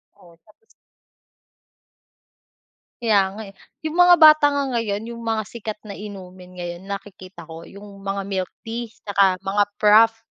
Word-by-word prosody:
Oo, 170 -4 -20
tapos 215 - -26 2.4
Kaya 215 -4 +3 0.2
nga, - - -6
eh, 195 - -13 0.3
'yung 310 - -3
mga 355 0 +6
bata 310 -2 +7
nga 285 -1 -1
ngayon, 220 -2 -2
'yung 235 - -10
mga 225 -1 -2
sikat 215 0 -7
na 200 - -7
inumin 185 -3 -11
ngayon, 175 0 -6
nakikita 195 -3 -9
ko 165 0 -10
'yung 200 +2 -13
mga 195 0 -3
milk 190 -2 -3 0.2
tea 230 +1 -5
saka 200 -4 +1
mga 195 +2 0
frappe. 225 +2 +5
205 Hz, 145 wpm, -21 LUFS, 190-225 Hz, 2.4 s, bata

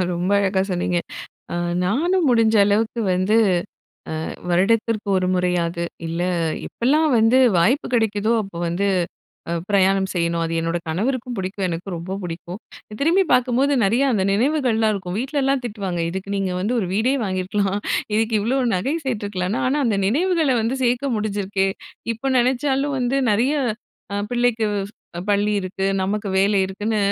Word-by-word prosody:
ரொம்ப 180 +3 -1
அழகா 190 -1 +1
சொன்னீங்க. 180 0 0 0.6
அ - - -1 0.3
நானும் 325 - +1
முடிஞ்ச 225 -2 +3
அளவுக்கு 215 +3 +1
வந்து 185 +4 +2 1.1
வருடத்திற்கு 215 +4 +1
அ - - +3
ஒரு 185 0 0
முறையாவது 175 -1 0 0.2
இல்ல 165 +1 -3 0.5
எப்பெல்லாம் 300 +7 +2
வந்து 225 +3 +4 0.2
வாய்ப்பு 235 - +2
கிடைக்குதோ, 220 -2 +1
அப்போ 195 -4 -9
வந்து 180 +4 0 0.8
பிரயாணம் 195 -1 +3
செய்யணும். 170 -1 0
அது 165 0 -2
என்னோட 165 +1 -1
கணவருக்கும் 240 +7 -2
புடிக்கும். 190 +1 -2
எனக்கும் 175 +2 -4
ரொம்ப 185 +3 -5
புடிக்கும். 175 +2 -6 0.4
திரும்பி 345 +6 +3
பார்க்கும்போது 255 +3 +3
நிறையா 235 +8 +2
அந்த 190 -3 +1
நினைவுகள்லாம் 230 -2 +2
இருக்கும், 185 -2 -4
வீட்லல்லாம் 270 0 0
திட்டுவாங்க, 195 -6 -3
"இதுக்கு 190 +2 -5
நீங்க 195 -2 -1
வந்து 220 +6 0
ஒரு 185 - -2
வீடே 235 +6 +2
வாங்கியிருக்கலாம். 195 +1 -1 0.4
இதுக்கு 225 0 +1
இவ்வளோ 240 +6 0 0.2
நகை 260 - -1
சேத்துருக்கலாம்." 205 -5 -2
ஆனா 280 +3 +1
அந்த 205 -3 +1
நினைவுகள 320 - +2
வந்து 235 +4 -1
சேர்க்க 245 +2 +1
முடிஞ்சிருக்கே. 200 -2 -1 0.5
இப்ப 265 +4 -2
நெனச்சாலும் 270 +3 +1
வந்து 250 +2 +1
நெறய 245 +8 +2 0.6
அ - - -1 0.2
பிள்ளைக்கு 240 -2 +1 0.2
ஸ் - - -34 0.4
பள்ளி 205 +1 +2
இருக்கு, 190 +1 -3 0.2
நமக்கு 205 +1 -2
வேலை 200 +1 +3
இருக்குன்னு 210 +3 -2
210 Hz, 140 wpm, -21 LUFS, 190-245 Hz, 1.1 s, வந்து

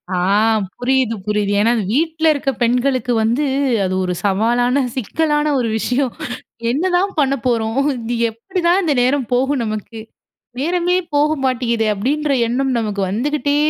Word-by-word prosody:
ஆ. - - 0 0.6
புரியுது, 250 -2 +1
புரியுது. 210 -1 0
ஏன்னா 230 +2 +3
இது 220 - -1
வீட்ல 320 +2 0
இருக்க 280 -1 -2
பெண்களுக்கு 250 +1 +1
வந்து 240 +7 +1 0.4
அது 185 - -2
ஒரு 180 - -1
சவாலான, 240 +7 +2
சிக்கலான 295 +5 0
ஒரு 235 -2 -1
விஷயம். 250 +2 0 0.6
"என்ன 285 +7 -1
தான் 390 +2 0
பண்ணப் 275 -4 +1
போறோம்? 225 +1 0 0.2
இது 235 +1 -3 0.2
எப்படி 365 - -5
தான் 365 +3 +4
இந்த 310 -4 +1
நேரம் 255 -1 +1
போகும் 265 +1 +1
நமக்கு? 215 +1 -5 0.6
நேரமே 355 +4 +1 0.2
போக 295 +1 +3 0.2
மாட்டேங்கிதே." 235 -3 0
அப்படின்ற 285 +8 -1 0.2
எண்ணம் 260 +2 0
நமக்கு 205 -3 -2
வந்துக்கிட்டே 285 +5 0
250 Hz, 145 wpm, -18 LUFS, 230-290 Hz, 0.6 s, தான்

